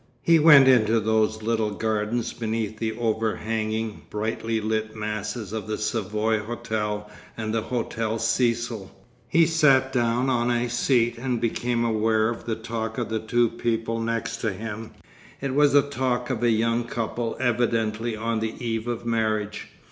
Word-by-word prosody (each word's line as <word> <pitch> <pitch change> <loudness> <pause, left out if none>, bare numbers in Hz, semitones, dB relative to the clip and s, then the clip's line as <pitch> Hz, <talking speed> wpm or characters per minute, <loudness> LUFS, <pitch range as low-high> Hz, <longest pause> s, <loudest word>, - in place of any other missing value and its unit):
He 165 -1 +5
went 150 -4 +8
into 115 -3 +5
those 110 0 +1
little 110 -1 +1
gardens 110 +2 -1
beneath 110 -1 -3
the 110 -1 -1
over 110 -2 0
hanging, 110 0 -3
brightly 110 +1 -2
lit 110 0 -2
masses 105 0 -4
of 110 -1 -4
the 110 - -2
Savoy 110 0 0
Hotel 105 -2 -3 0.3
and 110 -1 -3
the 115 - +1
Hotel 115 -1 -2
Cecil. 115 -2 0 0.4
He 165 +6 +4
sat 135 -5 +3
down 120 +1 +1
on 120 -2 +1
a 120 0 0
seat 120 -1 +2
and 125 -1 -1
became 120 +1 0
aware 110 0 +2
of 120 - -5
the 115 - -1
talk 110 0 -4
of 120 -3 -2
the 110 0 -1
two 120 +2 +2
people 115 0 -2
next 115 0 -2
to 115 -2 -1
him. 110 +2 -6 0.5
It 135 -1 -3
was 145 0 +4
the 145 -1 +6
talk 130 -2 -1
of 120 -3 -2
a 120 - +3
young 115 +1 +1
couple 115 0 -3
evidently 115 -2 0
on 115 +1 -1
the 110 0 -3
eve 115 -1 -3
of 120 -1 -3
marriage. 110 -2 -1
115 Hz, 165 wpm, -25 LUFS, 110-120 Hz, 0.5 s, went